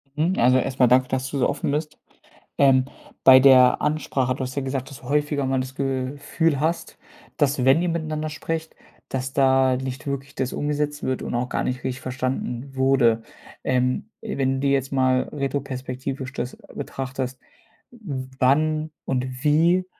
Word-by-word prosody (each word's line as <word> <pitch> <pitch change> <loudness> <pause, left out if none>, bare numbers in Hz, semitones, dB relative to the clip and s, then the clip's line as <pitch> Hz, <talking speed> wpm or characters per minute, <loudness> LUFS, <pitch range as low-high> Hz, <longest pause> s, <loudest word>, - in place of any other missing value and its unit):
Mhm, 165 +5 +1
also, 125 +2 +5
erstmal 130 0 +2
danke, 130 +1 +4
dass 130 0 -2
du 140 - -3
so 125 - +2
offen 140 0 -2
bist. 150 +1 -3 0.6
Ähm, 130 -2 +5 0.4
bei 130 0 +10
der 130 -1 +6
Ansprache 140 -4 0
du - - -11
hast 130 0 -4
ja 140 - -2
gesagt, 135 -1 -3
dass 140 - -11
du - - -10
häufiger 145 0 0
mal 130 0 0
das 130 0 -5
Gefühl 140 +3 -1
hast, 165 +3 -2 0.4
dass 140 -4 +1
wenn 135 +6 +5
ihr 180 - 0
miteinander 155 -2 -3
sprecht, 160 +1 -4 0.4
dass 130 0 -3
da 130 -1 +4
nicht 130 +1 -5
wirklich 140 0 -4
das 130 -2 -2
umgesetzt 150 0 -2
wird 130 0 -1
und - - -4
auch 125 +1 -1
gar - - -1
nicht 125 0 -3
richtig 130 0 -3
verstanden 130 0 -4
wurde. 130 -4 +3 0.4
Ähm, 125 - 0
wenn 135 -11 -1
die 140 0 +1
jetzt 135 -1 +1
mal 130 -1 +2
retroperspektivisch 135 -1 -4
das 125 -2 -5 0.2
betrachtest, 130 -1 -4 1.0
wann 155 +4 +2
und 130 0 -3
wie 170 +5 +3
135 Hz, 160 wpm, -23 LUFS, 130-145 Hz, 1.0 s, bei